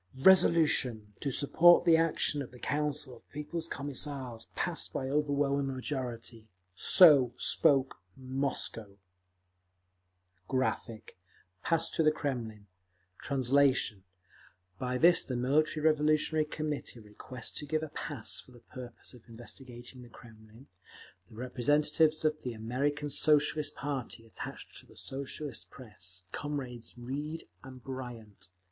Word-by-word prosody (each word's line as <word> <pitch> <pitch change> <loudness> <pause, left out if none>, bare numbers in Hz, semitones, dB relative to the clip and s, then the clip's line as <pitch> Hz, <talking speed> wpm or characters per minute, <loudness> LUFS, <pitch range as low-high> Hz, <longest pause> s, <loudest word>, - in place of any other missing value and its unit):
Resolution, 150 - +4
to 140 - -2
support 170 +6 +5
the 165 - +6
action 160 -2 +1
of 135 - -7
the 125 - -14
Council 145 0 -2
of 115 - -21
People's 160 +3 -5
Commissars, 140 -5 -4
passed 175 -1 -1
by 130 - -3
overwhelming 140 -1 0
majority. 120 -4 -5 0.3
So 135 - +7
spoke 135 -4 +3 0.2
Moscow…. 130 -6 -3 1.5
[Graphic, 120 -4 -2
page - - -16 0.5
254: - - -2
Pass 165 0 +2
to - - 0
the 155 -1 +5
Kremlin] 120 -9 -4 2.1
By 125 0 -2
this 170 +6 +5
the 130 - -4
Military 150 +5 +1
Revolutionary 155 0 +2
Commitee 150 -5 -5
requests 110 +3 -9
to 150 - -7
give 155 +2 -1
a 155 - -5
pass 145 -5 -3
for 130 - -15
the 120 - -16
purpose 120 +1 -10
of 120 -1 -17
investigating 120 +1 -10
the 120 - -13
Kremlin, 110 +1 -16 0.6
the - - -16
representatives 150 +6 +1
of 155 0 +1
the 125 - -4
American 140 +6 -2
Socialist 150 0 +3
party 135 -5 -5
attached 115 - -9
to - - -17
the - - -19
Socialist 140 +2 -6
press, 95 -7 -10
comrades 130 -6 -6
Reed 145 +6 -5 0.2
and 130 -2 -12
Bryant. 120 -8 -8
135 Hz, 125 wpm, -31 LUFS, 120-150 Hz, 2.1 s, So